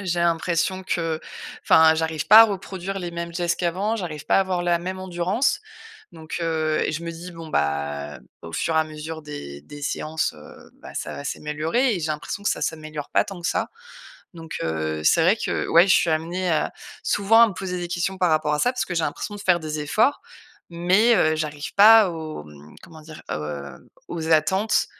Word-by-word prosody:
j'ai 175 Hz, -3 st, -1 dB
l'impression 170 Hz, +2 st, 0 dB
que, 165 Hz, -3 st, -1 dB, 0.5 s
enfin, 160 Hz, 0 st, +6 dB
j'arrive 160 Hz, -1 st, -2 dB
pas 215 Hz, +2 st, +11 dB
à -, -, +7 dB
reproduire 195 Hz, -2 st, -4 dB
les 175 Hz, -1 st, -4 dB
mêmes 170 Hz, 0 st, -5 dB
gestes 170 Hz, -1 st, -1 dB
qu'avant. 190 Hz, +6 st, 0 dB
J'arrive 155 Hz, -7 st, -6 dB
pas -, -, +3 dB
à -, -, +5 dB
avoir 185 Hz, -2 st, -1 dB
la 175 Hz, -1 st, +2 dB
même 185 Hz, +2 st, -5 dB
endurance, 185 Hz, +7 st, 0 dB, 0.5 s
donc, 160 Hz, -1 st, -7 dB
heu, 155 Hz, -1 st, 0 dB
et -, -, -1 dB
je 155 Hz, -, -4 dB
me 170 Hz, -, -4 dB
dis: 175 Hz, +2 st, -9 dB
«Bon 165 Hz, -1 st, -9 dB
bah, 75 Hz, -, -2 dB, 0.2 s
au 85 Hz, -, -9 dB
fur 160 Hz, -, -1 dB
et -, -, +5 dB
à -, -, 0 dB
mesure 155 Hz, +1 st, -8 dB
des 70 Hz, -, -8 dB
des 145 Hz, -, -12 dB
séances, 155 Hz, +2 st, -2 dB
heu, -, -, -15 dB
bah, -, -, -11 dB
ça -, -, -4 dB
va 140 Hz, -, -8 dB
s'améliorer» 155 Hz, -, -1 dB
et -, -, -4 dB
j'ai 160 Hz, -, -2 dB
l'impression 150 Hz, +6 st, -6 dB
que -, -, +2 dB
ça -, -, -2 dB
s'améliore 155 Hz, -2 st, -4 dB
pas -, -, +3 dB
tant 195 Hz, -3 st, -9 dB
que 170 Hz, -, -1 dB
ça, -, -, -1 dB, 0.6 s
donc, 165 Hz, -1 st, -9 dB
heu, 80 Hz, -1 st, -2 dB
c'est 165 Hz, -, +4 dB
vrai 180 Hz, +5 st, +5 dB
que -, -, -2 dB
ouais, 170 Hz, +4 st, +6 dB
je -, -, +6 dB
suis 170 Hz, -, +3 dB
amenée 170 Hz, +4 st, -1 dB
à, 155 Hz, -, +1 dB, 0.3 s
souvent 205 Hz, +3 st, +4 dB
à 230 Hz, -, +6 dB
me -, -, -5 dB
poser 180 Hz, -2 st, -4 dB
des 175 Hz, 0 st, -4 dB
questions 180 Hz, +2 st, -2 dB
par 180 Hz, -2 st, +2 dB
rapport 155 Hz, -1 st, +1 dB
à -, -, -2 dB
ça. 245 Hz, -, +2 dB
Parce 250 Hz, -, -2 dB
que 175 Hz, -, -4 dB
j'ai 165 Hz, -, 0 dB
l'impression 205 Hz, -, -4 dB
de -, -, -9 dB
faire 180 Hz, -3 st, +3 dB
des 155 Hz, -1 st, -4 dB
efforts, 215 Hz, -, +1 dB, 0.5 s
mais 190 Hz, +7 st, +3 dB
heu, 155 Hz, -4 st, +3 dB
j'arrive 150 Hz, -2 st, -5 dB
pas 215 Hz, -1 st, +8 dB
aux, 155 Hz, -, -7 dB
mmh, 75 Hz, 0 st, -15 dB
comment 160 Hz, -2 st, -13 dB
dire? 155 Hz, 0 st, -12 dB
Heu, 75 Hz, -2 st, -6 dB, 0.2 s
aux 160 Hz, -2 st, -4 dB
attentes, 190 Hz, +8 st, +2 dB
165 Hz, 215 wpm, -23 LUFS, 155-185 Hz, 0.6 s, pas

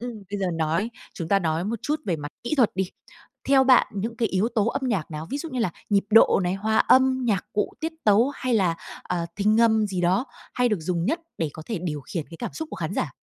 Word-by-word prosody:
Ừm, 245 Hz, +1 st, -4 dB, 0.2 s
bây 205 Hz, -, -3 dB
giờ 190 Hz, -, 0 dB
nói 165 Hz, +7 st, 0 dB, 0.2 s
chúng 165 Hz, -4 st, -5 dB
ta 200 Hz, -, +4 dB
nói 165 Hz, -2 st, -1 dB
một 220 Hz, +4 st, -2 dB
chút 300 Hz, +1 st, -1 dB
về 175 Hz, -, 0 dB
mặt 145 Hz, -1 st, -6 dB, 0.2 s
kỹ 240 Hz, -, 0 dB
thuật 245 Hz, -5 st, +4 dB
đi. 190 Hz, -1 st, -1 dB, 0.6 s
Theo 270 Hz, -1 st, +6 dB
bạn, 255 Hz, -1 st, +6 dB
những 220 Hz, +3 st, -4 dB
cái 230 Hz, -3 st, +1 dB
yếu 190 Hz, +4 st, +1 dB
tố 215 Hz, -3 st, +2 dB
âm 235 Hz, -, -1 dB
nhạc 195 Hz, -10 st, -1 dB
nào, 155 Hz, 0 st, -6 dB
ví 280 Hz, -, -2 dB
dụ 330 Hz, -, -5 dB
như 255 Hz, -2 st, -2 dB
là 190 Hz, -, +1 dB, 0.2 s
nhịp 200 Hz, -1 st, +3 dB
độ 220 Hz, -2 st, +6 dB
này, 180 Hz, +1 st, 0 dB
hòa 220 Hz, +3 st, 0 dB
âm, 260 Hz, 0 st, +4 dB
nhạc 205 Hz, -6 st, +1 dB
cụ, 210 Hz, -, 0 dB
tiết 320 Hz, +1 st, -2 dB
tấu 215 Hz, +5 st, +5 dB
hay 255 Hz, -2 st, -1 dB
là, 185 Hz, -6 st, +2 dB, 0.3 s
ờ, 175 Hz, -2 st, -2 dB
tinh 210 Hz, +2 st, +3 dB
âm 220 Hz, -2 st, +4 dB
gì 190 Hz, -3 st, -3 dB
đó 185 Hz, +8 st, +2 dB, 0.3 s
hay 250 Hz, 0 st, +2 dB
được 210 Hz, -6 st, 0 dB
dùng 170 Hz, +1 st, -1 dB
nhất 320 Hz, -, 0 dB, 0.2 s
để 160 Hz, -3 st, -1 dB
có 160 Hz, -, -9 dB
thể 220 Hz, -6 st, -3 dB
điều 150 Hz, -5 st, -3 dB
khiển 155 Hz, +3 st, -5 dB
cái 165 Hz, -, -9 dB
cảm -, -, -4 dB
xúc 320 Hz, -1 st, -5 dB
của -, -, -6 dB
khán 170 Hz, +1 st, -3 dB
giả? 140 Hz, -, -2 dB
205 Hz, 260 wpm, -25 LUFS, 175-235 Hz, 0.6 s, Theo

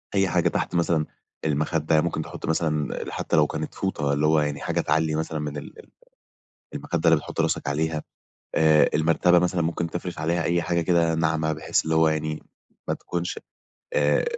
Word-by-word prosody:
أي 95 Hz, -1 st, +3 dB
حاجة -, -, +2 dB
تحت -, -, -2 dB
مثلًا 85 Hz, -2 st, +2 dB, 0.4 s
المخدة، 80 Hz, +1 st, +1 dB
يعني 75 Hz, -, +5 dB
ممكن 80 Hz, -2 st, -2 dB
تحُط -, -, -7 dB
مثلًا 80 Hz, -2 st, 0 dB, 0.2 s
حتّى -, -, -1 dB
لو 75 Hz, -1 st, +5 dB
كانت -, -, -5 dB
فوطة 75 Hz, -7 st, -1 dB
اللي 75 Hz, +2 st, +1 dB
هو 80 Hz, 0 st, +4 dB
يعني 75 Hz, -1 st, -2 dB
حاجة -, -, 0 dB
تعلّي 80 Hz, -1 st, +1 dB
مثلًا 80 Hz, 0 st, -2 dB
من 75 Hz, -1 st, -4 dB
ال 70 Hz, -, -9 dB
ال -, -, -15 dB, 0.9 s
المخدة 85 Hz, 0 st, 0 dB
اللي 80 Hz, -, +6 dB
بتحُط -, -, -5 dB
راسك -, -, 0 dB
عليها، 80 Hz, +2 st, -1 dB, 0.5 s
آآ 80 Hz, -1 st, +5 dB
المرتبة 85 Hz, +3 st, +4 dB
مثلًا 90 Hz, 0 st, +1 dB
ممكن 85 Hz, +1 st, -2 dB
تفرش 90 Hz, 0 st, -5 dB
عليها 85 Hz, +2 st, 0 dB
أي 85 Hz, 0 st, +1 dB
حاجة 85 Hz, 0 st, 0 dB
كده 85 Hz, -1 st, +2 dB
ناعمة 80 Hz, -1 st, +1 dB
بحيث 75 Hz, 0 st, 0 dB
اللي 80 Hz, -, 0 dB
هو 80 Hz, 0 st, +4 dB
يعني 80 Hz, 0 st, -2 dB, 0.5 s
ما -, -, +1 dB
تكونش 85 Hz, 0 st, -4 dB, 0.6 s
آآ -, -, +3 dB
80 Hz, 185 wpm, -25 LUFS, 75-85 Hz, 0.9 s, اللي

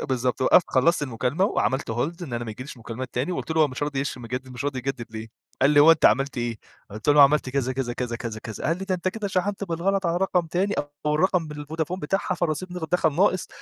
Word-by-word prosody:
بالضبط 130 Hz, -2 st, -1 dB
وقفت 165 Hz, +6 st, +6 dB
خلصت 150 Hz, +5 st, +3 dB
المكالمة 130 Hz, -, 0 dB
وعملت 130 Hz, -, 0 dB
Hold 160 Hz, +10 st, -2 dB
إن 150 Hz, -8 st, -7 dB
أنا 120 Hz, 0 st, -2 dB
ما 110 Hz, -, -5 dB
ييجيليش 130 Hz, +5 st, -8 dB
مكالمات 115 Hz, +2 st, -6 dB
تاني 130 Hz, +9 st, -1 dB
وقلت 170 Hz, -, -4 dB
له 160 Hz, -, +2 dB
هو: 150 Hz, -, +3 dB
"مش 130 Hz, +2 st, -6 dB
راضي 145 Hz, -2 st, -1 dB
يش 140 Hz, -1 st, -3 dB
مجدد 125 Hz, +2 st, -5 dB
مش 125 Hz, 0 st, -6 dB
راضي 140 Hz, -2 st, -2 dB
يجدد 125 Hz, -2 st, -4 dB
ليه؟" 110 Hz, 0 st, -7 dB, 0.3 s
قال 140 Hz, -, +6 dB
لي: 145 Hz, -1 st, +6 dB
"هو 160 Hz, +3 st, +9 dB
أنت 160 Hz, -, -2 dB
عملت 135 Hz, +1 st, +4 dB
إيه؟" 120 Hz, -2 st, -2 dB, 0.3 s
قلت 105 Hz, +5 st, -7 dB
له 145 Hz, -, +6 dB
أنا 145 Hz, -, +8 dB
عملت 140 Hz, -1 st, +4 dB
كذا، 130 Hz, -1 st, -1 dB
كذا، 130 Hz, -2 st, -2 dB
كذا، 120 Hz, -1 st, -3 dB
كذا، 115 Hz, -2 st, -5 dB
كذا، 110 Hz, 0 st, -7 dB
قال 165 Hz, +2 st, +1 dB
لي: 195 Hz, -, -5 dB
"ده 190 Hz, -1 st, -1 dB
أنت 180 Hz, +1 st, -1 dB
كده 205 Hz, +1 st, -4 dB
شحنت 195 Hz, +2 st, -1 dB
بالغلط 190 Hz, +2 st, 0 dB
على 170 Hz, 0 st, +1 dB
رقم 180 Hz, -2 st, +1 dB
تاني 190 Hz, +5 st, 0 dB, 0.3 s
أو 150 Hz, -, +2 dB
الرقم 175 Hz, 0 st, +2 dB
بالفودافون 155 Hz, +4 st, -4 dB
بتاعها 185 Hz, +4 st, -1 dB
فالرصيد 175 Hz, +1 st, -2 dB
ند 180 Hz, -, -4 dB
دخل 165 Hz, -3 st, +3 dB
ناقص." 185 Hz, -1 st, +2 dB
145 Hz, 245 wpm, -25 LUFS, 125-175 Hz, 0.3 s, هو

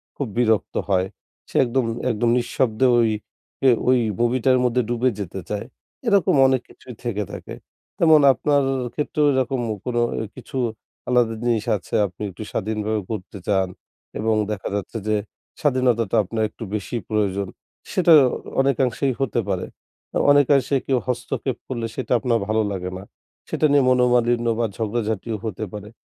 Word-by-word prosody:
খুব 140 Hz, -, -3 dB
বিরক্ত 110 Hz, -3 st, +1 dB
হয়। 95 Hz, -1 st, +2 dB, 0.4 s
সে -, -, -16 dB
একদম, 125 Hz, +1 st, 0 dB, 0.3 s
একদম 115 Hz, +1 st, +1 dB
নিঃশব্দে 120 Hz, 0 st, +1 dB
ওই 115 Hz, -1 st, +3 dB, 0.6 s
এ -, -, +8 dB, 0.2 s
ওই 130 Hz, -1 st, +5 dB, 0.2 s
মুভিটার 130 Hz, +2 st, +3 dB
মধ্যে 125 Hz, +1 st, +2 dB
ডুবে 120 Hz, +1 st, +2 dB
যেতে 95 Hz, -1 st, -5 dB
চায়। 105 Hz, +1 st, -3 dB, 0.4 s
এরকম 200 Hz, -8 st, +4 dB
অনেক 130 Hz, -2 st, +2 dB
কিছুই 125 Hz, -, -12 dB
থেকে 105 Hz, -4 st, -1 dB
থাকে। -, -, -8 dB, 0.4 s
তেমন 160 Hz, -2 st, +6 dB
আপনার 145 Hz, +3 st, +1 dB, 0.3 s
ক্ষেত্রেও 150 Hz, +1 st, 0 dB
এরকম 130 Hz, -1 st, 0 dB, 0.2 s
কোনো 120 Hz, -1 st, 0 dB, 0.3 s
কিছু 130 Hz, +1 st, -8 dB, 0.5 s
আলাদা 120 Hz, -2 st, +3 dB
জিনিস 115 Hz, -3 st, +1 dB
আছে 95 Hz, -, -16 dB
আপনি 90 Hz, +1 st, -16 dB
একটু 95 Hz, +3 st, -8 dB
স্বাধীনভাবে 110 Hz, +1 st, -1 dB
ঘুরতে 105 Hz, -3 st, -6 dB
চান 95 Hz, -2 st, +2 dB, 0.5 s
এবং 110 Hz, 0 st, +1 dB, 0.2 s
দেখা 105 Hz, -2 st, -4 dB
যাচ্ছে 105 Hz, +3 st, -4 dB
যে 110 Hz, -, +2 dB, 0.5 s
স্বাধীনতাটা 125 Hz, -7 st, +2 dB
আপনার 110 Hz, +3 st, -2 dB
একটু 115 Hz, -, -10 dB
বেশি 105 Hz, +3 st, -4 dB
প্রয়োজন, 100 Hz, -2 st, 0 dB, 0.4 s
সেটা 175 Hz, -2 st, +5 dB, 0.5 s
অনেকাংশেই 135 Hz, 0 st, +1 dB
হতে 135 Hz, -5 st, 0 dB
পারে। -, -, -1 dB, 0.7 s
অনেকাংশে 140 Hz, -1 st, +4 dB
কেউ 135 Hz, -, +2 dB
হস্তক্ষেপ 125 Hz, +1 st, -2 dB
করলে 120 Hz, -3 st, -3 dB
সেটা 130 Hz, -, -5 dB
আপনার 115 Hz, 0 st, +1 dB
ভালো 110 Hz, +1 st, +2 dB
লাগে 90 Hz, -2 st, -3 dB
না। 95 Hz, -, -9 dB, 0.5 s
সেটা -, -, +1 dB
নিয়ে 145 Hz, -1 st, +5 dB
মনোমালিন্য 120 Hz, -1 st, +3 dB
বা 120 Hz, -, +2 dB
ঝগড়াঝাটিও 110 Hz, -1 st, -2 dB
হতে 110 Hz, -1 st, -4 dB
পারে। 105 Hz, 0 st, -7 dB
120 Hz, 145 wpm, -22 LUFS, 110-130 Hz, 0.7 s, এ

